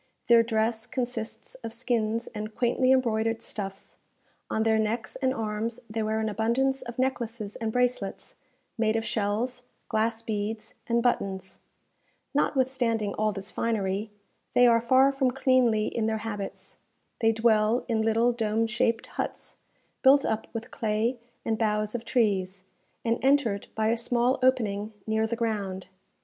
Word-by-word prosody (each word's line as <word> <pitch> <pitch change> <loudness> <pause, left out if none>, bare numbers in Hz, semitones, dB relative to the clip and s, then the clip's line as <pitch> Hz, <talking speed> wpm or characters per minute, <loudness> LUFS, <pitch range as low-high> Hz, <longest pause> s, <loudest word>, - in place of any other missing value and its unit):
Their 235 -1 +7
dress 220 0 0
consists 240 -4 -4
of 230 - -4
skins 230 -1 -1
and 215 0 -6
quaintly 255 +1 +2
embroidered 225 -3 +1
stuffs; 195 -2 -7 0.5
on 220 - +1
their 220 -1 +3
necks 220 +1 -2
and 260 -1 +1
arms 225 0 -3
they 220 +1 -3
wear 220 0 0
an 220 - 0
abundance 235 +6 +1
of 235 0 -8
necklaces 235 -5 -2
and 225 -1 -2
bracelets, 250 -5 -1 0.5
made 220 -1 +2
of 225 0 0
shells, 225 +5 -1 0.3
glass 225 +1 0
beads, 215 0 -3
and 235 0 +2
buttons. 190 -6 -1 0.7
Notwithstanding 255 -7 +1
all 215 0 +1
this 195 +1 -7
finery, 210 -2 -1 0.5
they 245 0 +7
are 230 -1 +5
far 260 +3 +5
from 270 -2 +1
cleanly 250 -4 +3
in 220 0 -1
their 220 0 0
habits. 205 -3 -6 0.4
They 225 -1 +4
dwell 225 +1 +2
in 225 -3 +1
little 225 +2 +3
dome 225 -1 0
shaped 230 0 0
huts, - - -5 0.4
built 275 +1 +6
up 220 0 -1
with 230 0 -6
clay 225 +3 0 0.3
and 220 -1 0
boughs 215 -1 0
of 240 -1 -4
trees, 195 -6 +1 0.4
and 230 0 +1
entered 265 -7 +2
by 220 0 +1
a 230 - +2
small 240 +2 +1
opening 220 -5 +1
near 220 0 +1
the 235 - -2
ground. 200 -5 -2
225 Hz, 150 wpm, -27 LUFS, 215-240 Hz, 0.7 s, Their